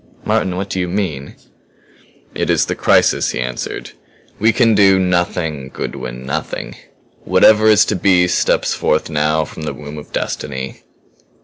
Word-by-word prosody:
"Martin! 90 -1 0
What 95 +1 -4
do 95 - -2
you 90 - -1
mean?" 85 -8 -3 1.0
"It - - -2
is - - +3
the - - -2
crisis," - - +2
he - - -3
answered. 60 0 -5 0.5
"We 110 +2 +4
can 115 -2 +3
do 100 -2 +5
nothing, 85 -6 -1
Goodwin 65 -1 -6
nothing. 75 +3 -4 0.5
Whatever 110 0 +5
is 105 -1 +6
to 105 - -1
be 90 -1 +3
steps 90 - +1
forth - - 0
now 75 +1 +1
from 80 - -10
the 75 - -4
womb 75 0 -8
of 75 - -13
Destiny." 65 +1 -4
85 Hz, 150 wpm, -17 LUFS, 75-95 Hz, 1.0 s, is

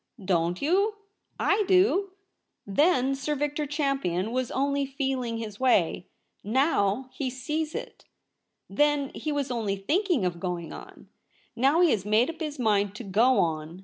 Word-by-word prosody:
' 200 - -13
Don't 175 +7 -3
you? 395 +8 +2 0.4
I 415 +2 +2
do. 385 0 +3 0.5
T/ie7i 270 - +2
Sir 295 +2 -2
Victor 295 +1 -2
Champion 270 - -1
was 255 0 -1
only 280 0 0
feeling 265 -4 -2
his 215 -3 -7
way. 195 -9 +2 0.4
JVow 250 -1 +1
he 270 -3 -3
sees 300 +5 -3
it. - - -7 0.6
Then 295 -2 +1
he 310 - -4
was 285 -3 -2
only 220 -5 -1
thinking 305 - 0
of 175 -1 -2
going 175 -2 -4
on. - - -12 0.5
Now 275 +8 +3
he 345 -4 +5
has 200 - 0
made 215 +7 +2
up 325 - -17
his 305 -3 -4
mind 205 -4 +1
to 240 - -7
go 230 +6 +3
on. 160 +1 -3
260 Hz, 155 wpm, -27 LUFS, 205-295 Hz, 0.6 s, he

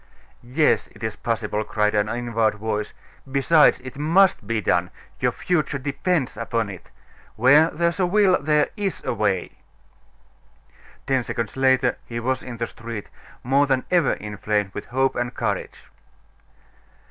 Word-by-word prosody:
"Yes, 135 +6 +1
it - - -13
is 110 -1 -2
possible," 110 -2 -2
cried 105 -1 0
an 105 0 +1
inward 115 -2 0
voice. 105 0 -3 0.4
"Besides, 150 +3 +4
it 130 +2 -9
must 170 - +3
be 115 0 0
done; 90 -3 +1 0.3
your - - +2
future 155 -5 -1
depends 145 0 -1
upon 115 -2 -2
it. 95 - -12 0.5
Where 145 +8 +5
there's 170 +2 -1
a 180 - +3
will, 195 0 +3
there's 155 +7 0
a - - 0
way." 100 -4 -1 1.5
Ten 130 -2 +1
seconds 115 -2 -4
later 130 -2 +2
he 115 0 -5
was 130 +2 -1
in 120 -2 -8
the 115 - -1
street, 115 -2 -8 0.3
more 140 +3 +3
than 130 -2 +1
ever 175 -5 +3
inflamed 105 -1 -2
with 105 - -6
hope 130 +2 0
and 120 0 -3
courage. - - -3
125 Hz, 145 wpm, -23 LUFS, 110-145 Hz, 1.5 s, Where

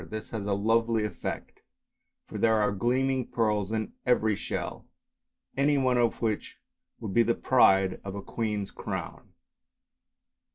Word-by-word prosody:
This 110 0 -6
has 105 -3 -4
a 100 - +1
lovely 115 +1 +2
effect, 100 -5 -6 0.6
for - - -7
there 110 -1 +4
are 105 -2 +2
gleaming 130 +5 0
pearls 105 -3 0
in 110 -1 -2
every 110 -4 +2
shell, - - -5 0.7
any 140 +2 +3
one 130 -2 +2
of 120 -1 +1
which 110 -2 -2 0.4
would 105 -5 -5
be 120 - +5
the 115 0 +2
pride 95 -7 +4
of 100 -1 -6
a 100 - -6
queen's 105 -3 -3
crown. - - -6
110 Hz, 140 wpm, -28 LUFS, 105-120 Hz, 0.7 s, be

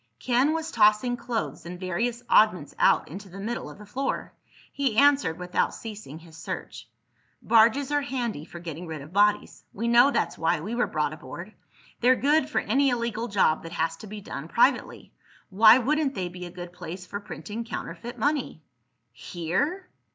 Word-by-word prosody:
Ken 250 - +2
was 325 0 -3
tossing 215 +2 +4
clothes 230 - -4
and 175 +1 -8
various 230 +7 -2
oddments 185 -9 +3
out - - +4
into 195 +5 -9
the 190 +3 -10
middle 230 +4 -4
of - - -12
the 210 - -12
floor. 265 +7 -3 0.4
He 270 -6 -1
answered 280 - +4
without 180 0 -1
ceasing 210 -10 -8
his 165 -1 -15
search. 115 -8 -7 0.5
"Barges 235 +5 +4
are 290 0 +2
handy 245 - -3
for 175 - -11
getting 170 0 -7
rid 155 -3 -6
of 155 +5 -14
bodies. 205 +1 +2
We 230 +4 -3
know 235 +3 +6
that's - - -1
why 165 -2 +1
we 205 +8 -5
were 245 +1 +1
brought 150 -1 -1
aboard. 170 +7 -9 0.5
They're 250 +2 +5
good 290 +2 +2
for - - 0
any 275 0 +2
illegal 235 -2 -2
job 195 -7 +2
that 165 +1 -9
has 165 0 -1
to 215 - -11
be 210 +1 -8
done 155 -5 -7
privately. 245 +8 +1 0.4
Why 215 +4 +8
wouldn't 280 +2 0
they 180 -2 -3
be 180 0 -8
a - - -9
good 175 0 -9
place 180 +1 -8
for 200 +3 -5
printing 205 +3 -7
counterfeit 235 +1 -7
money?" 285 - -1 0.5
"Here?" 185 - -3
210 Hz, 180 wpm, -26 LUFS, 175-245 Hz, 0.5 s, Why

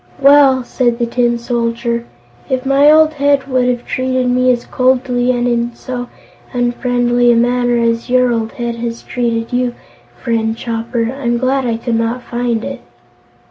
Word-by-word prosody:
"Well," 275 -2 +5
said 240 -1 0
the 240 - 0
Tin 240 0 0
Soldier, 235 0 -2 0.4
"if 260 0 -1
my 275 +2 +4
old 315 0 +5
head 285 -2 +1
would 255 -2 +1
have 245 -1 -2
treated 255 -1 -1
me 255 +1 +2
as 240 -1 -2
coldly 255 -1 +1
and 245 -1 +1
in 235 0 -1
so 245 -1 -6 0.4
unfriendly 245 0 +1
a - - +3
manner 245 +1 +1
as 230 +1 0
your 250 -1 +3
old 225 -1 -3
head 235 -1 -4
has 235 0 -5
treated 235 -1 -2
you, 245 -1 0 0.4
friend 225 -2 -1
Chopper, 230 0 -3
I'm 240 -3 -1
glad 260 +1 0
I 230 -1 -1
could 230 0 -2
not 230 +2 -2
find 240 -2 -2
it." - - -6
245 Hz, 165 wpm, -15 LUFS, 235-255 Hz, 0.4 s, Well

